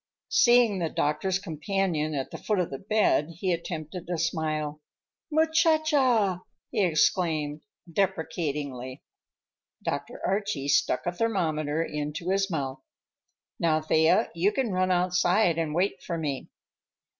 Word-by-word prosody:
_" - - -66 0.3
Seeing 240 -5 +5
the 165 -2 -1
doctor's 155 +7 0
companion 165 -3 -2
at 135 -2 -3
the - - -7
foot 210 - -1
of 180 -2 -1
the 135 - -5
bed, 195 -6 +1
he 185 0 0
attempted 170 0 -5
a 175 - -1
smile. 155 -2 -2 0.5
"Muchacha!" 310 - +3 0.3
he 215 -4 +1
exclaimed 155 -3 +1 0.3
deprecatingly. 150 -8 -2 0.8
Dr. - - -4
Archie 195 -8 -1
stuck 130 - +2
a 175 - 0
thermometer 165 -7 0
into 150 +4 -3
his 195 0 +1
mouth. 135 -5 -3 0.8
"Now, 160 -2 +2
Thea, 160 +2 +3
you 175 +5 +2
can 255 -4 -1
run 185 0 +1
outside 180 0 +2
and 155 -2 -2
wait 185 +4 0
for 170 - -4
me." 145 -5 -3
170 Hz, 130 wpm, -27 LUFS, 155-195 Hz, 0.8 s, Seeing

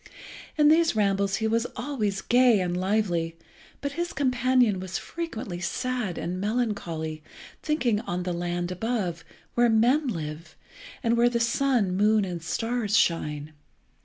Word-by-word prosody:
In 300 -1 +6
these 320 -3 +4
rambles 200 -1 +1
he 220 - 0
was 230 +2 +1
always 215 -9 -2
gay 245 -3 +5
and 180 -1 -1
lively, 180 -4 0 0.4
but 285 - -2
his 345 +4 -3
companion 250 -5 +2
was 185 0 -4
frequently 225 - -5
sad 245 0 -2
and 180 +2 -3
melancholy, 200 -9 -2 0.4
thinking 255 -9 +1
on 180 -5 -3
the 180 0 -2
land 175 +1 -2
above, 180 -3 -2 0.3
where 240 0 +4
men 245 +7 +3
live, 160 -6 -5 0.5
and 230 -1 +2
where 240 +1 +5
the 235 -1 -1
sun, 230 -4 +1
moon, 210 +1 +3
and 175 -2 -5
stars 225 +4 0
shine. 150 -2 0
215 Hz, 140 wpm, -26 LUFS, 180-245 Hz, 0.5 s, In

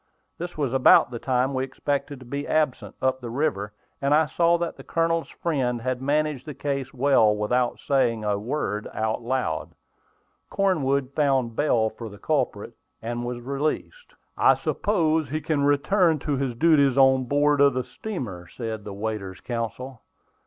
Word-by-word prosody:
This 175 0 -6
was 140 -4 -1
about 130 -2 +6
the 120 - -5
time 130 +2 0
we 130 0 0
expected 140 +1 -3
to 130 - -13
be 140 +4 -4
absent 155 -5 0
up 130 0 +1
the 120 - -6
river, 115 -6 -1 0.3
and 140 +1 +3
I 155 +1 +4
saw 170 +4 +2
that 170 -1 -3
the - - -12
Colonel's 165 0 0
friend 130 -7 -1
had 130 0 -2
managed 150 0 0
the 150 - -6
case 140 -2 -3
well 125 -5 +3
without 120 +4 0
saying 120 -5 +1
a 105 -1 0
word 105 -3 -3
out 110 +2 -1
loud. 130 +2 -2 0.7
Cornwood 140 -9 +1
found 135 -6 +1
bail 115 -7 +2
for 115 0 -8
the 100 - -12
culprit, - - -1 0.3
and 120 +1 -4
he 120 - -4
was 120 0 -5
released. 155 - -3 0.2
"I - - +5
suppose 160 -7 0
he 155 +3 -2
can 150 -2 0
return 160 +4 +3
to 145 0 -2
his 130 -3 -2
duties 140 -1 +4
on 130 -1 +5
board 145 +2 +2
of 140 -2 +5
the 130 - 0
steamer," 120 - -6
said 110 -1 -6
the 100 - -7
waiter's 100 -2 -4
counsel. 120 +1 -5
135 Hz, 170 wpm, -25 LUFS, 120-150 Hz, 0.7 s, about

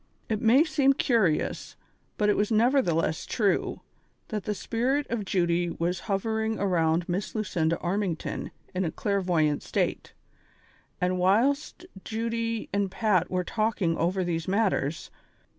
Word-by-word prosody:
It 215 -2 -1
may 245 +7 +6
seem 280 -4 +3
curious, 220 - 0 0.4
but 210 - +2
it 210 - +3
was 210 +2 0
nevertheless 215 - +2
true, 205 -5 0 0.5
that 210 -4 -4
the 210 - -1
spirit 255 +8 0
of 225 -3 -2
Judy 175 -2 +1
was 170 +2 -2
hovering 220 +2 0
around 170 -3 +1
Miss 190 +5 -3
Lucinda 170 -6 0
Armington 185 -2 -2 0.2
in 185 +1 0
a 170 - 0
clairvoyant 175 -6 0
state, - - -2 0.9
and 180 0 0
whilst 260 - +1 0.2
Judy 230 0 -2
and 200 -1 +1
Pat 190 -3 +1
were 180 0 0
talking 210 -4 0
over 185 +3 0
these 165 -2 -2
matters. 190 -7 0
200 Hz, 130 wpm, -27 LUFS, 175-225 Hz, 0.9 s, may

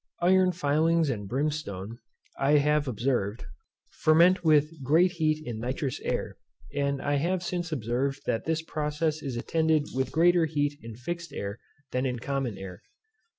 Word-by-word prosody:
Iron 185 +1 +5
filings 160 -1 +2
and 105 -5 -4
brimstone, 120 -7 -3 0.4
I 140 +2 +2
have 150 0 +3
observed, 120 -3 -1 0.5
ferment 175 +4 +4
with 155 -1 +3
great 165 +7 +4
heat 155 -3 0
in 115 -2 -5
nitrous 130 +3 -3
air, - - -3 0.4
and 140 -1 0
I 145 +1 0
have 175 +5 0
since 175 -1 -3
observed 135 +1 -1
that 115 - -1
this 160 0 -1
process 155 0 -2
is 130 -4 -4
attended 160 +3 +1
with 130 0 -1
greater 170 +1 +4
heat 145 -2 -1
in 115 -1 -9
fixed 170 +8 -5
air 100 +2 -5 0.3
than 125 +1 0
in 125 -1 -2
common 135 -4 -3
air. 95 -2 -8
145 Hz, 150 wpm, -28 LUFS, 125-160 Hz, 0.5 s, Iron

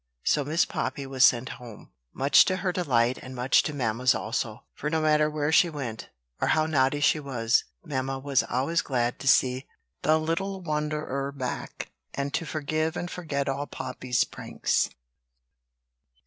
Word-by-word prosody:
So 150 - +2
Miss 155 +4 +2
Poppy 135 +1 -3
was 135 -1 +1
sent 125 +1 +5
home, 115 - -12 0.2
much 140 +2 +5
to 185 - +1
her 180 - +3
delight 130 -9 +1
and 130 0 -9
much 125 +1 +4
to - - -3
mamma's 125 -2 +1
also; 110 0 -3
for 150 - -3
no 160 0 +1
matter 150 -1 +3
where 150 0 -1
she 170 +2 +5
went, 130 -8 -6 0.3
or - - +2
how 155 0 +3
naughty 145 -2 +2
she 145 +2 +4
was, 125 -5 +1 0.2
mamma 135 -3 -2
was 135 -1 +1
always 140 +7 0
glad 120 -3 -1
to - - -6
see 130 -1 +3 0.3
the 155 +1 +4
little 175 +5 -2
wanderer 150 -3 -2
back, 130 -3 -5 0.2
and 140 0 -3
to 165 - -1
forgive 155 +2 -1
and 175 - -4
forget 145 -5 -3
all 140 +1 -2
Poppy's 125 -1 -1
pranks. - - -1
140 Hz, 160 wpm, -27 LUFS, 130-155 Hz, 0.3 s, sent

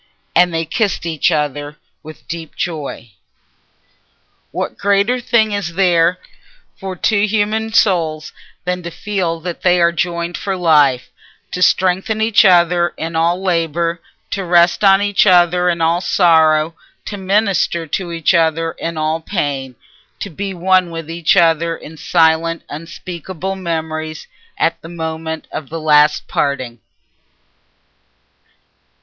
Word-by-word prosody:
And 175 0 +4
they 165 0 -2
kissed 195 +1 -1
each 165 +1 +1
other 150 -1 -2 0.2
with 155 0 -12
a - - -38
deep 165 -2 -7
joy. 145 -9 -5 1.4
What - - -4
greater 200 +5 +1
thing 230 -3 +2
is 195 -5 -3
there 175 -2 +3 0.6
for 190 -1 -6
two 205 +3 +1
human 220 +1 -1
souls 165 -8 +1 0.3
than 180 0 -2
to 170 - -6
feel 175 -2 -3
that 175 0 -6
they 180 -1 +3
are 170 0 +4
joined 170 0 -2
for 195 -1 -3
life—to 150 +1 0
strengthen 190 +4 +2
each 220 -1 +4
other 175 -1 +3
in 165 +1 -5
all 170 +3 +1
labour, 170 -1 -1 0.3
to 195 - -2
rest 175 +2 +3
on 195 0 +5
each 205 0 +2
other 180 -1 +4
in 170 -1 -1
all 165 +2 +2
sorrow, 160 -3 +3 0.3
to 205 - -5
minister 195 -3 0
to 175 +3 -4
each 165 +2 +1
other 165 -1 +1
in 165 0 -5
all 155 +1 -1
pain, 140 -8 -3 0.4
to 200 - -6
be 195 +4 -4
one 185 0 +2
with 165 -1 -7
each 170 +2 +1
other 165 -1 +2
in 160 - -12
silent 165 0 +1
unspeakable 175 +3 -6
memories 160 -3 -4 0.3
at 165 0 0
the 165 - -10
moment 160 -1 -5
of 150 - -6
the 165 +1 -5
last 150 -1 +3
parting? 130 -4 -2
170 Hz, 135 wpm, -17 LUFS, 160-185 Hz, 1.4 s, on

